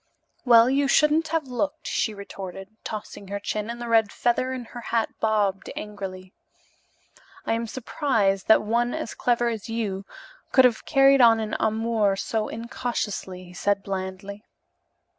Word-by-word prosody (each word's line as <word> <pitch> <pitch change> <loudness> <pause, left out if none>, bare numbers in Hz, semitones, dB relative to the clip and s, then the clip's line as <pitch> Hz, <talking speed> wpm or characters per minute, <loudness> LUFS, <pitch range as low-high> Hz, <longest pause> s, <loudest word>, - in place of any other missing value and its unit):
"Well, 235 -1 +7
you 275 +2 +2
shouldn't 300 +3 +3
have 320 -1 -1
looked," 290 +5 -3
she 220 - 0
retorted, 195 -1 -8
tossing 210 -2 -7
her 200 +1 -4
chin; 210 +1 -3
and 235 0 -5
the 240 - -5
red 225 -3 +3
feather 245 +2 0
in 255 -2 -5
her 240 - -7
hat 230 0 0
bobbed 205 -3 0
angrily. 190 -3 -7 1.1
"I - - 0
am 230 0 -2
surprised 220 -6 0
that 220 - +6
one 235 +3 0
as - - -4
clever 240 -1 +1
as 225 -2 -5
you 205 -4 -3
are - - -18
could 260 - +7
have 240 -3 +1
carried 275 -1 +5
on 230 -2 +6
an 215 -1 -3
amour 220 -2 +1
so 215 +2 -2
incautiously," 220 -5 -4
he 180 0 -13
said 200 +2 0
blandly. 195 +1 -5
225 Hz, 160 wpm, -25 LUFS, 200-245 Hz, 1.1 s, Well